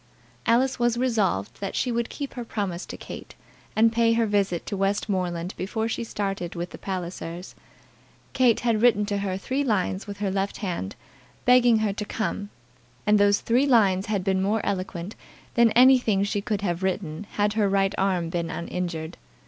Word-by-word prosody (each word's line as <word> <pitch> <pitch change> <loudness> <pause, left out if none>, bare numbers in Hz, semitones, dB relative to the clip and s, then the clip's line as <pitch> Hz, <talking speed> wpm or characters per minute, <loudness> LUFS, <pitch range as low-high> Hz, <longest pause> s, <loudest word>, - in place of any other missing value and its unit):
Alice 250 +3 +3
was 240 -1 +2
resolved 215 - 0
that 195 - -3
she 250 - 0
would 235 0 -1
keep 280 -2 -6
her 245 - -5
promise 200 -6 -4
to - - -7
Kate, - - -9 0.4
and 225 +1 +4
pay 230 0 +3
her 230 0 +2
visit 200 -5 0
to - - -3
Westmoreland 190 -3 -1
before 220 +4 -2
she 230 - -2
started 195 -6 -3
with 175 +1 -4
the - - -10
Pallisers. 180 -1 -5 0.8
Kate 250 -4 +3
had 230 -3 +1
written 220 -4 +4
to 205 -1 -1
her 190 -2 -2
three 260 +8 -1
lines 200 -4 -1
with 200 0 -6
her 200 -1 -1
left 195 +1 -1
hand, 175 - -4 0.5
begging 245 -2 +6
her 215 -2 0
to 210 - -4
come, 205 -1 -3 0.6
and 210 0 +4
those 205 0 +4
three 250 +5 +2
lines 200 -7 +3
had 205 -3 -1
been 190 -1 +1
more 210 +3 0
eloquent 185 0 -3 0.4
than 235 -1 +5
anything 245 -5 +5
she 200 0 -1
could 210 -1 -2
have 175 -3 -1
written 190 -1 -2
had 205 0 +1
her 210 -2 +2
right 195 0 +2
arm 185 -3 0
been 170 -1 -2
uninjured. 170 -1 -4
205 Hz, 180 wpm, -25 LUFS, 185-230 Hz, 0.8 s, begging